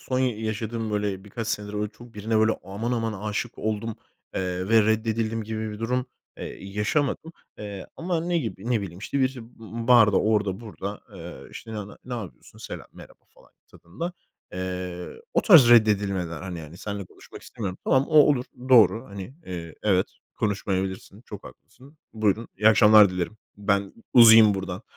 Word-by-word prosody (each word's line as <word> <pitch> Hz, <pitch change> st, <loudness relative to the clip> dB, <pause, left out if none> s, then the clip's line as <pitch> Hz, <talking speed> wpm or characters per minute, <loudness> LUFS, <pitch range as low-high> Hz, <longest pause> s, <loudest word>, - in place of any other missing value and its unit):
Son 130 Hz, -, -2 dB
yaşadığım 110 Hz, -2 st, -2 dB
böyle 105 Hz, -2 st, -2 dB
birkaç 110 Hz, +2 st, -6 dB
senedir 105 Hz, -2 st, -3 dB
böyle 105 Hz, 0 st, -2 dB
çok 120 Hz, +2 st, -16 dB
birine 110 Hz, +2 st, 0 dB
böyle 110 Hz, 0 st, +4 dB
aman 100 Hz, +6 st, -4 dB
aman 115 Hz, -2 st, -1 dB, 0.2 s
âşık 105 Hz, +3 st, -4 dB
oldum, 110 Hz, +1 st, -3 dB, 0.4 s
eee, 90 Hz, 0 st, -2 dB
ve 115 Hz, -1 st, +6 dB
reddedildim 110 Hz, +1 st, 0 dB
gibi 110 Hz, 0 st, -4 dB
bir 105 Hz, -, -8 dB
durum, 125 Hz, +3 st, -1 dB, 0.3 s
eee, -, -, -8 dB
yaşamadım. 125 Hz, +11 st, -1 dB, 0.3 s
Eee, 100 Hz, -2 st, -7 dB
ama 170 Hz, 0 st, -1 dB
ne 175 Hz, 0 st, +1 dB
gibi? 115 Hz, -5 st, -5 dB
Ne 120 Hz, -3 st, +2 dB
bileyim, 90 Hz, -3 st, -7 dB
işte, 110 Hz, +8 st, -3 dB
bir 130 Hz, 0 st, +1 dB
b 115 Hz, 0 st, -9 dB
barda, 115 Hz, -5 st, +6 dB
orada 105 Hz, -2 st, 0 dB
burada, 105 Hz, -2 st, -7 dB
eee, 85 Hz, -1 st, -10 dB
işte, 115 Hz, -, -9 dB
ne 105 Hz, -2 st, -5 dB
ne -, -, -12 dB
"ne 125 Hz, -, -5 dB
yapıyorsun, 100 Hz, -, -9 dB
selam, -, -, -8 dB
merhaba" -, -, -15 dB
falan -, -, -22 dB, 0.2 s
tadında, 135 Hz, -, -7 dB, 0.4 s
eee, 90 Hz, -, -5 dB
o -, -, +3 dB
tarz 160 Hz, -, +8 dB
reddedilmeler 100 Hz, -7 st, +3 dB
hani 90 Hz, -2 st, -6 dB
yani, 80 Hz, +2 st, -10 dB
"Seninle 100 Hz, -1 st, -5 dB
konuşmak -, -, -14 dB
istemiyorum." 95 Hz, -4 st, -6 dB
Tamam, 130 Hz, 0 st, +3 dB
o 155 Hz, -, -5 dB
olur, 145 Hz, -4 st, +5 dB, 0.2 s
doğru 115 Hz, -2 st, +6 dB
hani, 100 Hz, +5 st, -8 dB
eee, 85 Hz, -3 st, -7 dB
evet 95 Hz, -3 st, +2 dB, 0.3 s
konuşmayabilirsin, 95 Hz, -1 st, -3 dB
çok -, -, -10 dB
haklısın. 140 Hz, +5 st, -16 dB
"Buyurun, 110 Hz, +1 st, 0 dB
iyi 105 Hz, +2 st, +5 dB
akşamlar 105 Hz, -2 st, +7 dB
dilerim. 90 Hz, +3 st, -3 dB, 0.2 s
Ben 100 Hz, -1 st, 0 dB, 0.2 s
uzayayım 110 Hz, -3 st, +8 dB
buradan." 95 Hz, +1 st, -5 dB
105 Hz, 165 wpm, -25 LUFS, 95-115 Hz, 0.4 s, tarz